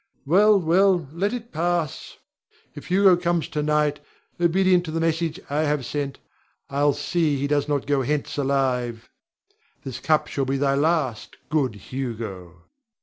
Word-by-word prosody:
Well, 200 Hz, +7 st, +5 dB
well, 180 Hz, -1 st, +3 dB
let 195 Hz, +5 st, 0 dB
it 240 Hz, -1 st, -6 dB
pass! 170 Hz, -2 st, -2 dB, 0.6 s
If -, -, -10 dB
Hugo 190 Hz, 0 st, +5 dB
comes 175 Hz, -2 st, -1 dB
to 150 Hz, -, -2 dB
night, 150 Hz, -1 st, +1 dB, 0.4 s
obedient 180 Hz, +1 st, +3 dB
to 160 Hz, -, -5 dB
the 165 Hz, -, -2 dB
message 165 Hz, +1 st, -1 dB
I 145 Hz, +2 st, -1 dB
have 150 Hz, -4 st, 0 dB
sent, 140 Hz, 0 st, -3 dB, 0.5 s
I'll 145 Hz, +1 st, +2 dB
see 150 Hz, +1 st, 0 dB
he 135 Hz, -, -1 dB
goes 145 Hz, 0 st, 0 dB
not 145 Hz, -2 st, -1 dB
hence 145 Hz, +1 st, 0 dB
alive. 130 Hz, -4 st, -1 dB, 0.7 s
This 130 Hz, -3 st, -6 dB
cup 155 Hz, -1 st, +2 dB
shalt 135 Hz, -2 st, -3 dB
be 135 Hz, +1 st, 0 dB
thy 135 Hz, 0 st, +1 dB
last, 140 Hz, -6 st, 0 dB
good 140 Hz, -8 st, +1 dB
Hugo! 105 Hz, -7 st, -6 dB
150 Hz, 145 wpm, -24 LUFS, 135-170 Hz, 0.7 s, Well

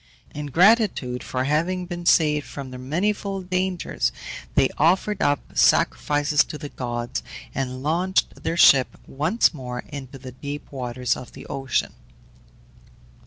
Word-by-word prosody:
In 150 Hz, 0 st, -5 dB
gratitude 175 Hz, -, +3 dB
for 130 Hz, 0 st, -2 dB
having 170 Hz, +6 st, 0 dB
been 175 Hz, -1 st, -6 dB
saved 150 Hz, -2 st, +3 dB
from 135 Hz, -2 st, -7 dB
their 125 Hz, -, -8 dB
manifold 190 Hz, +6 st, -2 dB
dangers 180 Hz, -, 0 dB, 0.4 s
they -, -, +4 dB
offered 190 Hz, +5 st, +2 dB
up 145 Hz, -1 st, 0 dB
sacrifices 145 Hz, +1 st, +3 dB
to 150 Hz, -, -7 dB
the 150 Hz, -1 st, -7 dB
gods, 120 Hz, -2 st, -4 dB, 0.3 s
and 130 Hz, -1 st, -3 dB
launched 175 Hz, +5 st, 0 dB
their 170 Hz, -, -2 dB
ship 135 Hz, -6 st, +6 dB
once 160 Hz, -, +1 dB
more 125 Hz, -4 st, -6 dB
into 135 Hz, -2 st, -8 dB
the 130 Hz, -1 st, -9 dB
deep 145 Hz, +3 st, -7 dB
waters 125 Hz, -2 st, -2 dB
of 125 Hz, -, -10 dB
the -, -, -11 dB
ocean. 135 Hz, -1 st, -2 dB
145 Hz, 135 wpm, -23 LUFS, 130-180 Hz, 0.4 s, ship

